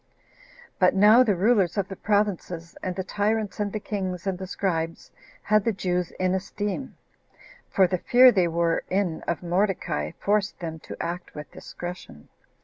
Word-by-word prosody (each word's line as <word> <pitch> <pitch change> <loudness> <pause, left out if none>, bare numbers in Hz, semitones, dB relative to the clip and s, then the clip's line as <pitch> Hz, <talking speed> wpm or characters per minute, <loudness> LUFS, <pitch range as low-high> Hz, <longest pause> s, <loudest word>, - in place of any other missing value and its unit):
But 180 0 +4
now 210 +5 +7
the 215 -6 +3
rulers 200 0 +2
of 195 -2 0
the 195 - -7
provinces, 190 -5 -1
and 185 -1 -3
the 190 - -3
tyrants, 210 +2 -1
and 205 -1 -1
the 215 - -3
kings, 190 -4 -4
and 195 -1 0
the 190 - -5
scribes, 165 -4 -3 0.3
had 215 -1 +3
the 230 - +1
Jews 180 -3 -1
in 185 0 +1
esteem; 205 +6 -4 0.7
for 190 - +4
the 185 0 -1
fear 250 +5 +7
they 185 -6 +2
were 170 0 0
in 185 -4 0
of 170 +1 -2
Mordecai 180 -3 -1
forced 205 -1 0
them 160 -2 -5
to - - -9
act 175 +1 -5
with 150 0 -8
discretion. 175 - -9
190 Hz, 165 wpm, -25 LUFS, 175-205 Hz, 0.7 s, now